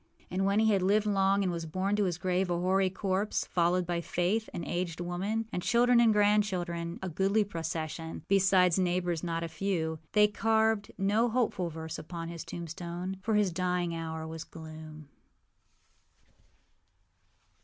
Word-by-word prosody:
And 190 +2 0
when 200 +2 +3
he 220 0 +4
had 195 - +2
lived 205 +3 +3
long, 195 -1 +2
and 185 - 0
was 165 -1 -4
borne 190 +5 -1
to 205 - +2
his 175 -3 -1
grave 180 +1 0
a 175 - +1
hoary 185 +2 +2
corpse, 195 +2 -1
followed 175 +1 +1
by 170 0 -1
Faith, 185 +6 -1
an 170 - -5
aged 175 -2 -3
woman, 195 +6 -2
and 180 - -1
children 245 +3 +4
and 235 -2 +5
grandchildren, 190 -5 +1
a - - -2
goodly 195 +5 +2
procession, 165 -3 -5
besides 190 -2 +4
neighbors 175 -2 0
not 165 -1 -2
a - - -2
few, 160 -3 -2
they 210 -1 +6
carved 220 0 +1
no 210 +5 +2
hopeful 220 -7 0
verse 160 0 -6
upon 165 +1 -6
his 170 -1 -6
tombstone, 170 +3 -5
for 220 +2 0
his 205 -3 +3
dying 180 -1 0
hour 160 -1 -4
was 160 0 -6
gloom. 155 -2 -10
180 Hz, 160 wpm, -30 LUFS, 170-200 Hz, -, they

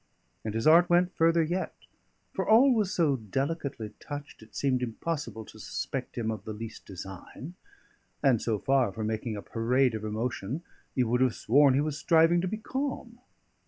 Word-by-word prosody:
And 110 -1 -4
his 115 - -1
art 170 +3 +7
went 175 +1 +3
further 165 0 +4
yet; 175 +4 -2 0.6
for - - -2
all 250 +5 +7
was 210 -5 +1
so 150 -6 +2
delicately 130 - -3
touched, 145 -3 -8
it 110 - -16
seemed 130 -3 +1
impossible 120 -2 -4
to - - -14
suspect - - -5
him 110 -2 -1
of 105 -3 -6
the 110 - -5
least 110 +1 -8
design; 95 - -9 0.7
and 130 -6 +4
so 110 -2 0
far 130 -1 +2
from 110 +3 -4
making 110 0 -2
a 100 - -7
parade 125 +3 +1
of 110 -1 -4
emotion, 115 - -3 0.3
you 125 -4 +2
would 125 +2 +1
have 130 -3 +3
sworn 140 +2 +4
he 140 - +3
was 150 -1 -2
striving 165 +1 +4
to 185 - -1
be 215 +4 -3
calm. 255 0 -4
130 Hz, 180 wpm, -29 LUFS, 110-165 Hz, 0.7 s, art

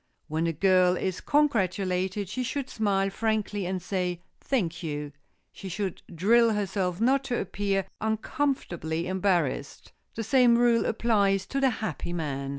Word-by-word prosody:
When 160 +2 -1
a - - +1
girl 185 +2 +3
is 185 0 -2
congratulated, 195 - +1
she 255 +7 -3
should 260 +2 -3
smile 195 -2 +1
frankly 210 -2 -1
and 185 0 -2
say 180 -1 -3 0.2
"Thank 180 -11 -1
you!" 150 -3 -4 0.4
She 195 - -8
should 190 0 -3
drill 225 +6 +4
herself 190 -3 -1
not 265 +4 +3
to 245 -2 -1
appear 195 0 -1 0.2
uncomfortably 220 - -1
embarrassed. 180 -7 -1 0.2
The 225 - -3
same 245 0 +5
rule 240 -1 +3
applies 200 -4 +2
to 275 - -2
the 270 - +4
happy 215 -6 -4
man. 140 -5 -3
195 Hz, 145 wpm, -27 LUFS, 180-225 Hz, 0.4 s, same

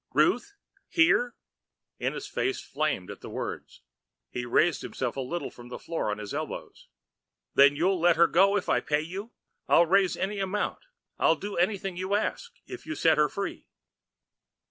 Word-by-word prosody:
"Ruth 405 - +2 0.3
here?" 245 -8 +3 0.6
Ennis' - - -2
face 390 0 -1
flamed 140 -10 -2
at - - -11
the - - -8
words, - - -6 0.5
and - - -3
he 120 - -3
raised 165 +6 +3
himself 125 -2 -3
a 135 - -2
little 170 +7 -4
from 120 0 -13
the - - -6
floor 165 -9 -3
on 105 - -2
his 105 -1 -7
elbows. - - -6 0.7
"Then 140 +1 +6
you'll 180 +4 +1
let 170 0 +4
her 170 0 +6
go 195 +4 +4
if 195 - -3
I - - +3
pay 150 0 0
you? 190 +8 -7 0.4
I'll 170 - +6
raise 190 +2 +3
any 200 +2 -2
amount, 195 +2 -2 0.4
I'll 165 - +4
do 205 +5 -6
anything 190 0 0
you 185 +2 -1
ask, 475 - -2
if 370 - -9
you'll 320 - -3
set 160 - +3
her 150 -1 +4
free." 200 +6 -5
175 Hz, 175 wpm, -28 LUFS, 150-200 Hz, 0.7 s, Then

